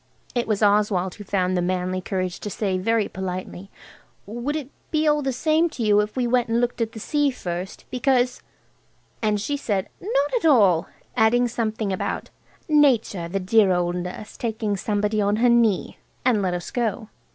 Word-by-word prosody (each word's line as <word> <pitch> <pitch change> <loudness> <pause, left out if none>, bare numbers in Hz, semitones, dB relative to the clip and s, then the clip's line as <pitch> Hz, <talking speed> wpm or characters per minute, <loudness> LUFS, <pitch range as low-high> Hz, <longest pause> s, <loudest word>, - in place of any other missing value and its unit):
It 240 -1 -1
was 215 -1 0
Oswald 200 -3 +2
who 205 - -10
found 185 -2 0
the 180 - +1
manly 185 +1 -1
courage 185 -1 -3
to 210 - -5
say 195 -2 -1
very 225 +2 +1
politely– 185 0 -6 0.6
"Would 240 +8 -3
it 290 -3 -5 0.2
be 310 0 +1
all 300 0 +3
the 270 -1 -1
same 315 +6 +2
to 245 - -5
you 210 -1 +4
if 210 0 -1
we 250 - +1
went 245 0 +1
and 230 +1 +2
looked 245 0 -1
at 225 -1 -1
the 220 - -7
sea 290 +5 +1
first? 180 -6 -5
Because–" 250 -1 +1 0.8
And 210 -2 +1
she 255 +8 -2
said, 205 -9 -2
"Not 290 -8 0
at 455 - -3
all," 200 - +5 0.3
adding 245 +1 +4
something 220 -3 -2
about 185 - -3 0.4
"Nature, 255 - +3
the 195 +3 -2
dear 195 +1 +4
old 175 -1 +1
nurse, 180 +4 -6
taking 220 -3 -2
somebody 210 +1 0
on 205 +1 +2
her 240 +3 +3
knee," 230 -5 +2 0.3
and 235 -5 +3
let 180 -2 0
us 175 - -6
go. 230 -2 -2
215 Hz, 185 wpm, -23 LUFS, 190-245 Hz, 0.8 s, all